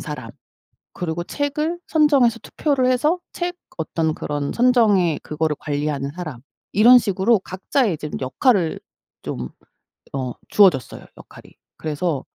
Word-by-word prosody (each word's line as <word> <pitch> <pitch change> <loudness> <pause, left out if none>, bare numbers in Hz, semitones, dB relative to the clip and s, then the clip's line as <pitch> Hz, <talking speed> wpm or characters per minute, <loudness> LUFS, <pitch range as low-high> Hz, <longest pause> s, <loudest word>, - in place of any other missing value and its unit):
사람, - - -7 0.6
그리고 175 -1 -3
책을 300 - -2
선정해서 280 -7 +4
투표를 280 -4 0
해서 275 +7 +2
책 350 0 -3 0.2
어떤 160 0 -1
그런 145 -2 -3
선정의 220 - +3
그거를 155 0 -2
관리하는 145 -2 -2
사람, 155 -9 -6 0.3
이런 240 +5 +8
식으로 205 +1 +2
각자의 190 - -1
좀 150 - -6
역할을 165 - +1 0.4
좀 65 0 -5 0.6
어 130 -2 -2 0.2
주어졌어요, 180 - +3
역할이. - - -15 0.2
그래서 155 -2 -2
185 Hz, 280 characters per minute, -21 LUFS, 150-250 Hz, 0.6 s, 이런